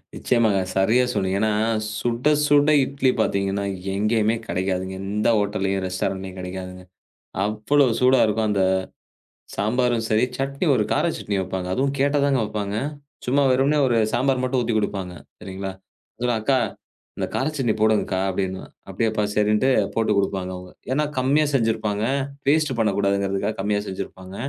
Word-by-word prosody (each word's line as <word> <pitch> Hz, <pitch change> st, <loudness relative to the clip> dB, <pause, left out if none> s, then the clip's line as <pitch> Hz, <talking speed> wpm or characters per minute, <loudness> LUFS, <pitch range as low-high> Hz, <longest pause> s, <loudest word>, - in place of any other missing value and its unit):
நிச்சயமாங்க. 110 Hz, -6 st, +2 dB
சரியா 110 Hz, +7 st, +3 dB
சொன்னீங்க. 95 Hz, -1 st, 0 dB
ஏன்னா 110 Hz, 0 st, +2 dB, 0.5 s
சுட 120 Hz, +5 st, +1 dB, 0.2 s
சுட 145 Hz, 0 st, +4 dB, 0.2 s
இட்லி 135 Hz, -1 st, 0 dB
பாத்தீங்கன்னா 100 Hz, -1 st, 0 dB, 0.3 s
எங்கேயுமே 110 Hz, +2 st, +1 dB
கெடக்காது. 95 Hz, -2 st, -1 dB, 0.2 s
எந்த 105 Hz, +3 st, -1 dB
ஹோட்டல்லயும் 100 Hz, -2 st, -1 dB
ரெஸ்டாரென்ட்லயும் 95 Hz, 0 st, -3 dB
கெடக்காதுங்க. 90 Hz, 0 st, -7 dB, 0.6 s
அவ்வளவு 115 Hz, +4 st, +2 dB
சூடா 130 Hz, 0 st, +5 dB
இருக்கும் 110 Hz, +1 st, 0 dB
அந்தச் 95 Hz, -2 st, +2 dB, 0.7 s
சாம்பாரும் 120 Hz, +1 st, +1 dB
சரி, 110 Hz, +1 st, +3 dB
சட்னி 140 Hz, +5 st, -2 dB
ஒரு 105 Hz, -, +2 dB
கார -, -, +1 dB
சட்னி 100 Hz, -1 st, -3 dB
வைப்பாங்க. 95 Hz, 0 st, -4 dB
அதுவும் 135 Hz, +1 st, 0 dB
கேட்டாதாங்க 140 Hz, -1 st, +2 dB
வைப்பாங்க. 105 Hz, -1 st, -3 dB, 0.5 s
சும்மா 140 Hz, +3 st, +2 dB
வெறுமனே 135 Hz, +4 st, +2 dB
ஒரு 120 Hz, -, +1 dB, 0.2 s
சாம்பார் 130 Hz, 0 st, +1 dB
மட்டும் 130 Hz, 0 st, +1 dB
ஊத்தி 115 Hz, -1 st, -1 dB
கொடுப்பாங்க. 95 Hz, -3 st, -3 dB, 0.3 s
சரிங்களா? 95 Hz, 0 st, -6 dB, 0.7 s
அக்கா 135 Hz, +4 st, +2 dB, 0.6 s
இந்தக் -, -, -3 dB
கார 130 Hz, -, 0 dB
சட்னி 120 Hz, -6 st, +1 dB
போடுங்கக்கா 105 Hz, -3 st, +2 dB
அப்படின்னா, 95 Hz, 0 st, -2 dB, 0.3 s
அப்படியாப்பா 110 Hz, -2 st, 0 dB
சரின்னுட்டு 105 Hz, +4 st, +2 dB, 0.3 s
போட்டுக் 110 Hz, -2 st, +1 dB
கொடுப்பாங்க 95 Hz, -2 st, -1 dB
அவங்க. 90 Hz, 0 st, -10 dB, 0.2 s
ஏன்னா 150 Hz, +3 st, +1 dB
கம்மியா 140 Hz, +4 st, +3 dB
செஞ்சிருப்பாங்க. 110 Hz, -4 st, 0 dB, 0.4 s
வேஸ்ட்டு 145 Hz, -3 st, +2 dB
பண்ணக்கூடாதுங்கறதுக்காகக் 100 Hz, -1 st, 0 dB
கம்மியா 105 Hz, 0 st, 0 dB
செஞ்சிருப்பாங்க. 95 Hz, 0 st, -7 dB
105 Hz, 130 wpm, -23 LUFS, 95-125 Hz, 0.7 s, சூடா